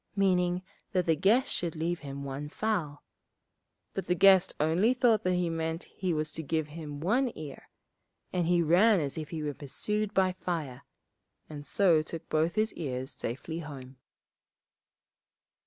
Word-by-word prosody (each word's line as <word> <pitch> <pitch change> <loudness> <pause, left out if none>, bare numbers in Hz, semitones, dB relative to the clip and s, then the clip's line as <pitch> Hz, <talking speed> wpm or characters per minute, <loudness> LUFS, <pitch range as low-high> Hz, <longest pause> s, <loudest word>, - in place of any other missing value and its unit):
meaning 180 -2 +2 0.3
that 180 -2 +2
the 165 - +3
guest 210 - +3
should 170 -2 -2
leave 170 +2 -1
him 140 -1 -7
one 140 +2 -5
fowl; 165 -7 -2 0.9
but - - -4
the 180 - +2
guest 190 0 +6
only 175 +11 +3
thought 240 -4 +4
that 185 0 +2
he 180 -1 +1
meant 165 0 -2
he 185 -2 -3
was 155 -1 -1
to 160 - -5
give 155 0 -1
him 150 -2 -7
one 240 - +1
ear, 150 -3 -9 0.6
and 175 -2 +1
he 175 -1 +3
ran 185 +6 +5
as 140 -3 -3
if 155 -2 -5
he 160 -2 -4
was 145 -1 -2
pursued 210 +9 -2
by 190 -3 +3
fire, 160 -8 -4 0.7
and 145 -1 -8
so 175 -6 +4
took 160 +1 -7
both 160 +2 +1
his 220 +1 +1
ears 130 -4 -4
safely 160 +7 -5
home. 135 -4 -9
165 Hz, 160 wpm, -30 LUFS, 150-185 Hz, 0.9 s, guest